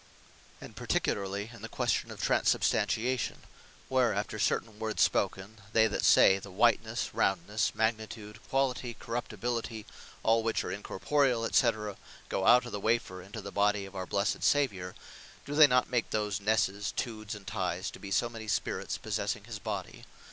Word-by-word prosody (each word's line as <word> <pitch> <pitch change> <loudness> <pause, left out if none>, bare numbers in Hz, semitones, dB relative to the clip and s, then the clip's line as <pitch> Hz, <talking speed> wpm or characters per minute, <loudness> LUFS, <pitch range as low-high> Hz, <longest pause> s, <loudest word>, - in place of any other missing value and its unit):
And - - -11
particularly, 100 +2 -1
in 115 - -12
the 115 - -7
question - - 0
of - - -9
Transubstantiation; 125 +3 +1 0.4
where 125 -5 +2
after 105 +1 -3
certain 110 +1 0
words 110 -1 +1
spoken, 100 +4 -1
they 110 -1 +5
that - - -1
say, 95 0 +6
the 100 - -10
White 115 +4 +3
nesse, 110 +2 -4
Round 95 -3 +1
nesse, 105 +1 0
Magni 110 0 0
tude, 105 -1 -10
Quali 135 -1 +2
ty, 120 -1 -6
Corruptibili 120 0 -3
ty, 110 -3 -7 0.4
all 115 +1 +4
which 115 0 0
are - - -4
incorporeall, 120 +3 0
&c. 110 -5 +1 0.3
go 95 - 0
out 125 +1 +7
of 120 - -7
the 105 - -3
Wafer, 110 -4 0
into 100 +4 -8
the 100 - -7
Body 100 0 +1
of 95 0 -12
our 95 -1 -4
blessed 100 0 0
Saviour, 95 -11 +1 0.5
do 140 - -5
they 150 0 +8
not 125 -2 +3
make 120 -3 0
those 105 -2 -1
Nesses, 100 -1 +1
Tudes 110 -2 -4
and 100 -2 -11
Ties, 90 -1 -2
to - - -11
be 100 - -8
so 110 +4 +2
many 115 -2 -9
spirits 105 - -2
possessing - - -3
his - - -7
body? - - -5
110 Hz, 175 wpm, -30 LUFS, 100-120 Hz, 0.5 s, they